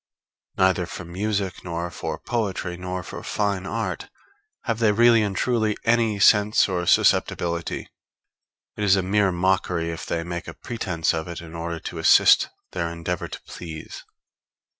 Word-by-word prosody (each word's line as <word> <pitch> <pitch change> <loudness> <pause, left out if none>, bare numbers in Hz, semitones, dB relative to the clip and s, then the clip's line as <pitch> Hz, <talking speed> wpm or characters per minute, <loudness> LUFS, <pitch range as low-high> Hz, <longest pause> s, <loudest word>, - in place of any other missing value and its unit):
Neither 95 -2 +2
for 90 - -7
music, 95 +1 -2
nor 85 -1 -4
for - - -4
poetry, 100 -6 -3
nor 90 +1 -5
for - - -8
fine 100 -2 -1
art, 100 -8 -3 0.5
have 115 -1 -2
they 110 -2 +4
really 115 +1 +5
and 100 -2 -1
truly 110 -4 +1
any 115 -2 +2
sense 105 +1 +5
or 90 -2 -2
susceptibility; 85 -1 +1 0.9
it 105 - -3
is 100 -1 +5
a 95 - 0
mere 100 +1 +2
mockery 90 -2 0
if 80 - -7
they 85 - -1
make 85 0 -5
a - - -8
pretence 90 -9 -2
of 80 0 -3
it 85 -1 -6
in 80 -1 -10
order 85 0 -4
to - - -6
assist - - +6 0.2
their 85 -2 -2
endeavor 85 +1 -4
to - - -8
please. 80 -3 -9
90 Hz, 160 wpm, -24 LUFS, 85-105 Hz, 0.9 s, assist